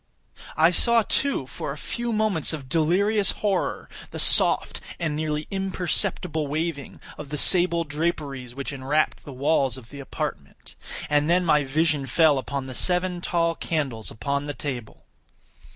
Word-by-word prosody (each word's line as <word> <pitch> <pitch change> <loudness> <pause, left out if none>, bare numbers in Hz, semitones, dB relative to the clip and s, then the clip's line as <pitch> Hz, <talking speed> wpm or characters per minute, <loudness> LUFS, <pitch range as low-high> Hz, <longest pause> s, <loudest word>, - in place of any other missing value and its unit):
I 160 +2 +6
saw, 235 +5 +4
too, 275 - 0
for 130 +2 -6
a 145 - -6
few 235 +9 -3
moments 215 -9 +1
of 145 -4 -6
delirious 190 +8 +2
horror, 200 -3 -1 0.2
the - - -8
soft - - +3 0.2
and 160 -4 -1
nearly 150 0 -2
imperceptible 180 -4 -1
waving 155 -1 -3 0.2
of 150 -2 -7
the 150 - -3
sable 175 0 +4
draperies 145 -5 -3
which 140 +1 -5
enwrapped 140 +3 0
the 145 - -8
walls 135 0 +1
of 115 -3 -13
the 140 - -9
apartment. 135 - -6 0.3
And 150 +1 +2
then 180 +1 +3
my 150 -3 +4
vision 145 0 +1
fell 150 +1 +4
upon 140 0 -4
the 130 - -7
seven 180 +4 +1
tall 170 -1 +1
candles 140 -10 -3
upon 140 +6 -3
the 145 - -4
table. 125 -7 -6
155 Hz, 150 wpm, -25 LUFS, 140-175 Hz, 0.3 s, I